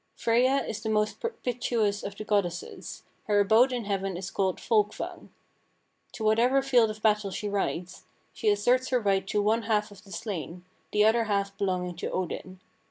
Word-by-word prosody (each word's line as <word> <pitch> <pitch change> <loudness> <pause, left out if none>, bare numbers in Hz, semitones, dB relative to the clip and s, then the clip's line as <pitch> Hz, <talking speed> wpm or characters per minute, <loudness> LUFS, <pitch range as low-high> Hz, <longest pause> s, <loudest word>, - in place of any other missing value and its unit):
Freyja 255 +4 +2
is 215 - -4
the 220 - -3
most 210 0 0
propitious 240 - -1
of 200 - -6
the 215 - -6
goddesses; 195 -5 -2 0.2
her 205 -1 +3
abode 220 +6 +5
in 245 -3 -3
heaven 195 -2 -2
is 190 +1 -6
called 190 -2 0
Folkvang. 210 -2 -1 0.8
To 225 - -6
whatever 240 +5 +3
field 245 -5 +4
of 215 0 -8
battle 210 -2 +2
she 205 +2 -4
rides, 185 -3 -3 0.3
she 215 - 0
asserts 245 +5 +2
her 255 - +2
right 195 -3 +1
to 205 +1 0
one 220 +3 +2
half 210 -1 0
of 195 -2 -14
the 195 - -16
slain, 180 -2 -5 0.3
the 210 0 +4
other 225 +1 +3
half 200 -2 -1
belonging 180 -3 -2
to - - -3
Odin. 185 +1 -4
210 Hz, 175 wpm, -28 LUFS, 195-225 Hz, 0.8 s, abode